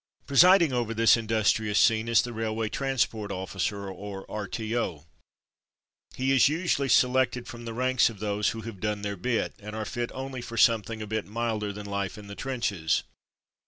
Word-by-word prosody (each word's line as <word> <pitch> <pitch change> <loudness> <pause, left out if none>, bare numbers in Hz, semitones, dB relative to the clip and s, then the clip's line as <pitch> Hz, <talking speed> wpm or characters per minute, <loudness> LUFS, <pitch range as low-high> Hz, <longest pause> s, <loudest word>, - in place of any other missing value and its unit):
Presiding 170 +1 +6
over 120 -2 -1
this 115 +1 +6
industrious 110 -2 +1
scene 110 +3 +4
is 115 0 +4
the 120 - -5
Railway 110 0 -2
Transport 115 -4 -1
Officer 100 +1 -3
or 95 +1 -7
R.T.O. 105 -5 -3 1.1
He 130 +1 0
is 135 0 +5
usually 155 -4 0
selected 125 0 +3
from 120 0 -9
the 115 - -5
ranks 130 0 +3
of 115 - -10
those 105 0 0
who 115 - -5
have 110 -4 -8
"done 105 0 -2
their 100 0 -2
bit,'' 115 +5 -1
and 105 +1 -8
are 110 -1 -3
fit 120 +1 -3
only 130 -1 -5
for 115 -1 -7
some 115 -2 +5
thing 110 +1 -6
a - - -5
bit 110 0 -3
milder 110 -1 -2
than 105 +1 -8
life 100 0 -3
in 105 - -10
the 100 - -8
trenches. 105 -10 -1
110 Hz, 180 wpm, -27 LUFS, 105-120 Hz, 1.1 s, Presiding